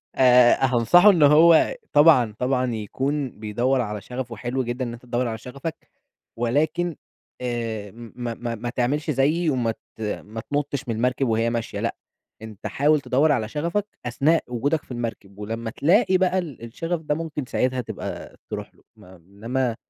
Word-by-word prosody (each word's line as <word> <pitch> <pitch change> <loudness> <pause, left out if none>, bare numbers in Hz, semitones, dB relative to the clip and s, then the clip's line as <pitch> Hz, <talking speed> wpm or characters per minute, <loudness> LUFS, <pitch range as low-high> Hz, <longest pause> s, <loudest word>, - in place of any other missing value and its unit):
آآ، 125 -1 +6
هانصحه 130 - +5
إن 170 -6 +4
هو 160 - +6 0.2
طبعًا 145 -8 +5
طبعًا 125 -1 0
يكون 135 +5 -3
بيدوَّر 120 +5 0
على 105 -2 -4
شغَفه، 125 0 -6
وحلو 125 +3 -2
جدًا 120 +2 -3
إن 120 - -5
أنتَ 120 - -10
تدوَّر 120 0 -1
على 110 -1 -3
شغفك، 140 +7 -8 0.5
ولكن 155 +8 0 0.5
آآ، 115 -4 -3
م 115 0 -11
ما 120 -2 -4
ما 120 -1 -4
ما 120 +2 -5
تعملش 145 +6 -1
زيِّي، 155 +5 +2
وما 125 -5 0 0.2
ت - - -13
ما 110 +1 -4
تنُطَّش 145 0 -3
من 115 - -1
المركب 125 +3 0
وهي 115 0 +1
ماشية، 115 -1 -3
لأ، - - -2 0.5
أنتَ 110 -2 -8
حاول 150 +1 +2
تدوَّر 145 +5 +2
على 110 -6 0
شغفك 170 - -1 0.2
أثناء 145 +7 +2
وجودك 140 +6 -1
في - - -16
المركب، 115 -5 -6
ولمّا 115 +2 -4
تلاقي 185 - +3
بقى 185 0 +1
ال 150 -10 -7
الشغَف 165 +8 -4
ده 150 -1 -1
ممكن 155 -4 -4
ساعتها 130 +1 0
تبقى - - -7
ترُوح - - -6
له، - - -26
ما 95 +1 -16
إنّما 115 +8 -3
125 Hz, 170 wpm, -23 LUFS, 115-150 Hz, 0.5 s, آآ